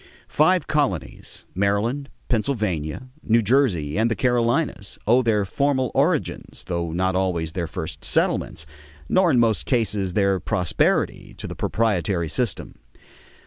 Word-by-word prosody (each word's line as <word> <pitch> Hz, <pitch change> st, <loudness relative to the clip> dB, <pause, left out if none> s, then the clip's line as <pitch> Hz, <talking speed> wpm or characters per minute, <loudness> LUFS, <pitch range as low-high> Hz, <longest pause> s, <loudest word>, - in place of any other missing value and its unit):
Five 170 Hz, +2 st, +3 dB
colonies, 140 Hz, -, -2 dB
Maryland, 105 Hz, +9 st, 0 dB, 0.2 s
Pennsylvania, 105 Hz, -, -2 dB
New 115 Hz, +1 st, +2 dB
Jersey, 105 Hz, -, +1 dB
and 115 Hz, +1 st, +3 dB
the 115 Hz, -, 0 dB
Carolinas, 120 Hz, -2 st, 0 dB
owe 120 Hz, +4 st, +4 dB
their 110 Hz, -4 st, +1 dB
formal 130 Hz, +2 st, 0 dB
origins, -, -, -1 dB
though 85 Hz, -2 st, -3 dB
not 95 Hz, +2 st, 0 dB
always 90 Hz, -4 st, -1 dB
their 85 Hz, -1 st, -3 dB
first -, -, -6 dB
settlements, 80 Hz, -, 0 dB, 0.4 s
nor 185 Hz, -2 st, +3 dB
in 130 Hz, -6 st, +3 dB
most 115 Hz, -2 st, +1 dB
cases 105 Hz, -7 st, +1 dB
their 100 Hz, -2 st, +2 dB
prosperity, 90 Hz, -6 st, 0 dB
to -, -, -7 dB
the -, -, -6 dB
proprietary 95 Hz, -6 st, 0 dB
system. 100 Hz, -, -2 dB
105 Hz, 130 wpm, -23 LUFS, 90-125 Hz, 0.4 s, owe